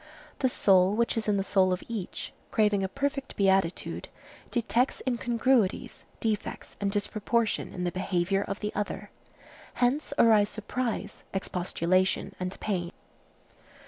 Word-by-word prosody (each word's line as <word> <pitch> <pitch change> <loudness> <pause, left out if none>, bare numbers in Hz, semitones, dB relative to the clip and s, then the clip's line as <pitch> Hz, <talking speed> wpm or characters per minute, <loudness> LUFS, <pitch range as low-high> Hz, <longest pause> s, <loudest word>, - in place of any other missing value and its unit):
The 260 - +3
soul 190 -4 +4
which 235 +1 +1
is 225 -1 -1
in 205 -1 +3
the 195 - +1
soul 190 -1 +3
of 180 - -1
each, 220 -6 -5 0.2
craving 210 -2 +2
a 190 - 0
perfect 275 +2 -2
beatitude, 190 -3 +1 0.4
detects 240 +2 0
incongruities, 240 -3 +1
defects 220 -3 -3
and 200 -1 +1
disproportion 215 +2 0
in 180 - -4
the 175 - 0
behavior 185 +1 0
of 200 - -4
the 210 0 -2
other. 205 0 -4 0.6
Hence 255 +5 +1
arise 215 -3 +5
surprise, 230 +2 -3
expostulation 185 0 0
and 185 +1 -4
pain. 175 -4 -2
205 Hz, 130 wpm, -28 LUFS, 190-235 Hz, 0.6 s, arise